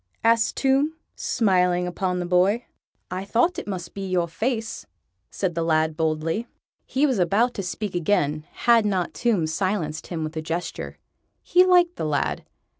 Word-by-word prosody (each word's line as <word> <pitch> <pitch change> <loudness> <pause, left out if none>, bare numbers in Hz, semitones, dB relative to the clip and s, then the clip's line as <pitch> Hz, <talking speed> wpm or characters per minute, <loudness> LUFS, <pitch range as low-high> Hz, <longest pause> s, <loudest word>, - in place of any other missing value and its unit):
asked 230 0 +3
Tomb, 275 +4 +2 0.2
smiling 180 -5 +2
upon 180 +1 -2
the 180 - -2
boy. 185 +6 +2 0.5
"I 185 +1 -3
thought 240 - +1
it - - -8
must 180 -4 -5
be 195 - -5
your 175 -2 +1
face," 225 +6 -3 0.4
said 185 -3 -2
the 165 - -2
lad 160 -1 +1
boldly. 160 +7 -1 0.4
He 275 +3 +2
was 260 -8 +1
about 205 +8 +2
to - - -4
speak 195 +2 -4
again, 155 -4 0
had 235 -2 +4
not 190 -4 -1
Tomb 215 -9 +1
silenced 160 -1 -2
him 165 -3 -4
with 155 +1 -5
a 160 - -2
gesture. 165 +3 -4 0.5
He 360 - +5
liked 355 -1 +4
the - - -2
lad. 150 -2 -1
185 Hz, 165 wpm, -24 LUFS, 165-230 Hz, 0.5 s, He